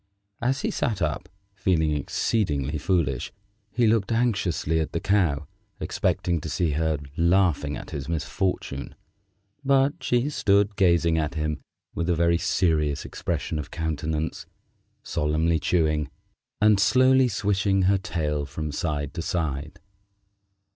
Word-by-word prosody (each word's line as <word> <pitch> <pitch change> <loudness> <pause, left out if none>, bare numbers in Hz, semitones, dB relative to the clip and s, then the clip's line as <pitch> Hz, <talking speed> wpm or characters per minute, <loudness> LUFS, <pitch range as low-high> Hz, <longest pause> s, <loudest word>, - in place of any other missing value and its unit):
As 130 +3 0
he - - -1
sat 110 -5 -1
up, 80 -4 -2 0.2
feeling 85 -5 +1
exceedingly 75 - -1
foolish, 85 -2 0 0.4
he 115 +3 +1
looked 110 -1 +2
anxiously 100 -9 +1
at 80 - -3
the 85 - 0
Cow, 85 -8 +1 0.3
expecting 85 -3 -1
to 80 - -5
see 85 +1 0
her 80 +1 0 0.2
laughing 85 -4 +2
at - - -9
his 70 -2 -5
misfortune, 80 -3 -2 0.7
but 135 +1 +2
she 120 +2 +1
stood 100 -5 +2
gazing 85 -3 +3
at 75 0 -2
him 75 -1 -2 0.3
with 85 +1 -2
a 85 - +3
very 85 0 +2
serious 75 -7 +1
expression 80 - -3
of 75 - -6
countenance, 80 -1 -3 0.6
solemnly 80 +2 0
chewing, 75 -4 +1 0.5
and 105 -1 +5
slowly 130 +4 +5
swishing 100 -2 +1
her 95 +1 +3
tail 75 -5 -2
from 75 +1 -4
side 75 -2 -2
to 85 - -4
side. 80 -3 -3
85 Hz, 130 wpm, -25 LUFS, 75-100 Hz, 0.7 s, and